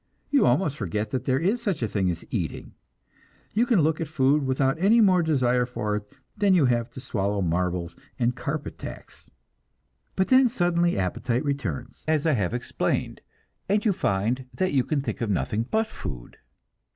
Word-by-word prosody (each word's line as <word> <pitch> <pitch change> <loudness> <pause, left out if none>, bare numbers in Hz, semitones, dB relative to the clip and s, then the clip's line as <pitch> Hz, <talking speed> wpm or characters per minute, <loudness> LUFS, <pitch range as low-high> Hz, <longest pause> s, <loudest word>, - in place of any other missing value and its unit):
You 285 - +4
almost 155 -7 +2
forget 105 +2 -3
that 130 - -2
there 130 0 +2
is 195 - 0
such 195 - -1
a - - +1
thing 95 -3 0
as 85 -1 -4
eating; - - -4 0.8
you 235 +4 +2
can 225 -8 +4
look 155 +2 +1
at 165 - -2
food 140 -1 +2
without 135 +3 +1
any 210 +6 +5
more 190 -5 +5
desire 125 -6 +2
for 105 -4 -2
it 105 0 -5 0.3
than 200 -3 +3
you 165 -6 +4
have 120 -1 +1
to - - -8
swallow 100 -4 -1
marbles 90 0 -1 0.2
and 120 -1 +1
carpet 145 +3 -4
tacks. - - -10 0.9
But 190 - +1
then 255 -1 +6
suddenly 175 -5 +1
appetite 115 - -1
returns, 135 - -4
as 155 -1 +1
I 160 - +4
have 105 -10 0
explained, 120 - -2 0.5
and 205 +2 +2
you 210 - +4
find 120 - -1
that 185 +2 0
you 135 -3 +3
can 150 0 -1
think 135 - -4
of 115 - -1
nothing 105 +4 -1
but 220 0 +2
food. 65 - -8
135 Hz, 180 wpm, -25 LUFS, 105-175 Hz, 0.9 s, then